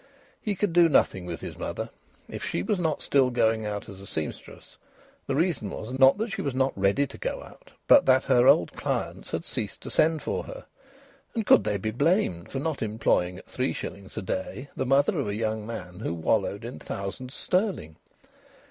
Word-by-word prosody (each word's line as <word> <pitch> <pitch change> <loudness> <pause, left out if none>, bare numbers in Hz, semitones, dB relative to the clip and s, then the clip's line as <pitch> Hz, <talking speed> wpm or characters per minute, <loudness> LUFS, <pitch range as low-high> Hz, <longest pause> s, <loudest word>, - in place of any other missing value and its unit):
He 210 -2 -1
could 195 -2 0
do 170 -1 +6
nothing 95 - +2
with 85 -4 -5
his - - -6
mother. - - -4 0.4
If - - -7
she 85 - -1
was 190 - 0
not 160 -4 -1
still 135 -2 +3
going 110 -3 +1
out 105 -1 -4
as 95 -1 -10
a 100 - -11
sempstress 80 -3 -6 0.5
the 135 - 0
reason 160 - 0
was, 110 +5 -6
not 135 +5 +7
that 220 +1 -2
she - - -3
was 140 -3 -2
not 130 0 +1
ready 100 +8 +2
to - - -11
go - - -3
out, - - -16 0.2
but 280 - +7
that 130 0 +5
her 125 -1 +4
old 85 - +5
clients - - -3
had - - -3
ceased - - -4
to - - -7
send 160 -1 +2
for - - -2
her. - - -9 0.7
And 225 -2 -1
could 110 - +6
they 105 -1 +1
be 110 +3 -2
blamed 140 - +1
for - - -4
not 150 +1 -2
employing 105 -5 +1
at - - -12
three - - -2
shillings 100 +1 -7
a 110 - -2
day 95 +9 -4
the 130 - -2
mother 140 +6 +3
of 135 - -1
a 100 - -2
young 110 -1 -2
man 90 -6 -7
who 95 -6 -2
wallowed 100 +6 0
in 120 - -7
thousands 125 +7 -6
sterling? 180 - -1
125 Hz, 205 wpm, -27 LUFS, 100-160 Hz, 0.7 s, not